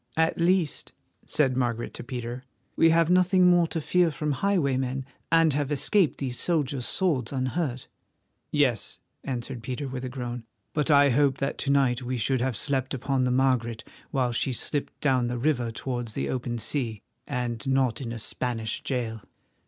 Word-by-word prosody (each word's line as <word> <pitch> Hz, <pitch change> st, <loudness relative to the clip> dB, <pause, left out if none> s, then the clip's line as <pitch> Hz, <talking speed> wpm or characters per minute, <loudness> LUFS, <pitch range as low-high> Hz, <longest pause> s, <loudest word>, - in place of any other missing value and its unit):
"At 160 Hz, +1 st, +2 dB
least," 175 Hz, -2 st, +1 dB, 0.3 s
said 135 Hz, -4 st, +2 dB
Margaret 120 Hz, -2 st, -1 dB
to -, -, -7 dB
Peter, 125 Hz, 0 st, -5 dB, 0.3 s
"we 165 Hz, -, +5 dB
have 165 Hz, +1 st, +4 dB
nothing 185 Hz, 0 st, +4 dB
more 175 Hz, -1 st, +5 dB
to 165 Hz, -, -2 dB
fear 175 Hz, +2 st, +2 dB
from 150 Hz, -1 st, -2 dB
highwaymen, 135 Hz, -6 st, 0 dB, 0.3 s
and 165 Hz, -2 st, +5 dB
have 145 Hz, 0 st, -1 dB
escaped 170 Hz, +4 st, +2 dB
these 130 Hz, -3 st, -2 dB
soldiers' 145 Hz, -7 st, 0 dB
swords 170 Hz, -9 st, 0 dB
unhurt." 130 Hz, 0 st, -2 dB, 0.6 s
"Yes," 130 Hz, -7 st, +1 dB, 0.3 s
answered 125 Hz, -1 st, -4 dB
Peter 130 Hz, +4 st, -4 dB
with 130 Hz, -1 st, -5 dB
a 130 Hz, -, -3 dB
groan, 125 Hz, -2 st, -5 dB, 0.3 s
"but 150 Hz, +1 st, 0 dB
I 140 Hz, -2 st, +6 dB
hoped 140 Hz, +1 st, +3 dB
that 135 Hz, -, -1 dB
to 140 Hz, -, -1 dB
night 135 Hz, -3 st, +3 dB
we 125 Hz, 0 st, -3 dB
should 130 Hz, +2 st, +1 dB
have 125 Hz, -4 st, 0 dB
slept 135 Hz, -1 st, 0 dB
upon 130 Hz, 0 st, 0 dB
the -, -, +1 dB
Margaret 125 Hz, -3 st, +1 dB, 0.3 s
while 125 Hz, -2 st, 0 dB
she 125 Hz, +2 st, 0 dB
slipped 145 Hz, +4 st, -3 dB
down 130 Hz, -4 st, +2 dB
the 120 Hz, 0 st, -2 dB
river 120 Hz, -3 st, 0 dB
towards 120 Hz, -1 st, -4 dB
the -, -, -2 dB
open 125 Hz, -2 st, -2 dB
sea, 115 Hz, -2 st, -2 dB, 0.2 s
and 125 Hz, -3 st, -3 dB
not 130 Hz, -3 st, +1 dB
in 120 Hz, -3 st, -4 dB
a 115 Hz, -, -4 dB
Spanish 115 Hz, 0 st, -3 dB
jail. 115 Hz, -4 st, -3 dB
130 Hz, 170 wpm, -27 LUFS, 125-150 Hz, 0.6 s, I